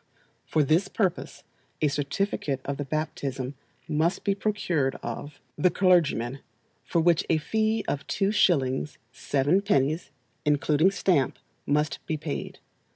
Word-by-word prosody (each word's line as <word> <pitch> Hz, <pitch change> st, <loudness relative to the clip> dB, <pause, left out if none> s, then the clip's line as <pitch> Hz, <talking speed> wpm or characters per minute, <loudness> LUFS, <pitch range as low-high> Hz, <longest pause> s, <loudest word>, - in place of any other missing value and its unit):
For 155 Hz, -, +2 dB
this 160 Hz, +7 st, +2 dB
purpose 195 Hz, -4 st, -2 dB, 0.4 s
a 155 Hz, -, +3 dB
certificate 145 Hz, 0 st, -1 dB
of 140 Hz, 0 st, -3 dB
the 145 Hz, -, -3 dB
baptism 140 Hz, -3 st, -3 dB, 0.3 s
must 160 Hz, +3 st, 0 dB
be 200 Hz, -, +2 dB
procured 185 Hz, -9 st, 0 dB
of 145 Hz, -1 st, -6 dB, 0.2 s
the 180 Hz, -, +5 dB
clergyman, 160 Hz, -, +2 dB, 0.4 s
for 170 Hz, -, 0 dB
which 170 Hz, 0 st, +3 dB
a 165 Hz, -, +4 dB
fee 220 Hz, +6 st, 0 dB
of 140 Hz, -, -3 dB
2s. 150 Hz, -9 st, +1 dB, 0.2 s
7d. 145 Hz, -1 st, +1 dB, 0.3 s
(including 150 Hz, +3 st, +3 dB
stamp) 180 Hz, -8 st, +1 dB, 0.3 s
must 150 Hz, +1 st, +1 dB
he 155 Hz, -, -1 dB
paid. 150 Hz, -1 st, -5 dB
155 Hz, 120 wpm, -27 LUFS, 140-185 Hz, 0.4 s, the